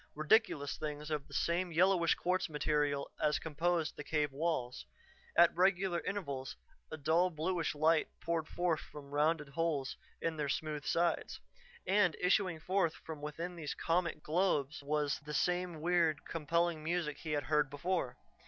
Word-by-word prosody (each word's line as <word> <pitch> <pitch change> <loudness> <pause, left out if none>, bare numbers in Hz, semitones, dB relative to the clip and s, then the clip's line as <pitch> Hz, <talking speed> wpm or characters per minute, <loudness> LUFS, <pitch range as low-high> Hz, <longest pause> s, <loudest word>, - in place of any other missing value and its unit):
Ridiculous 155 - +2
things 150 0 -5
of 150 -2 -2
the - - -14
same 175 +1 0
yellowish 175 0 +4
quartz 185 0 0
material 150 -2 0
as 150 0 +3
composed 165 +1 -1
the 150 - -6
cave 150 -1 0
walls. 140 -4 -2 0.5
At 170 0 +6
regular 185 0 +2
intervals 140 -11 -4 0.4
a 155 - -4
dull, 160 +5 +3
bluish 165 0 -1
light 155 +1 +3
poured 165 -2 -1
forth 175 -3 0
from 140 -2 -11
rounded 150 0 +1
holes 145 -2 -1 0.2
in 165 -1 -2
their 150 -2 -1
smooth 150 0 -2
sides. 170 +1 0 0.5
And 195 -4 +3
issuing 180 -2 +2
forth 180 0 +1
from 155 -2 -8
within 165 +4 -5
these 155 -4 -4
comic 170 -2 0
globes 155 -4 +1
was 145 0 0
the 150 0 -6
same 180 -3 0
weird, 165 -3 +2
compelling 165 0 0
music 165 -2 -1
he 155 -2 -4
had 145 -1 0
heard 150 +1 +2
before. 145 -3 -2
160 Hz, 155 wpm, -34 LUFS, 150-175 Hz, 0.5 s, At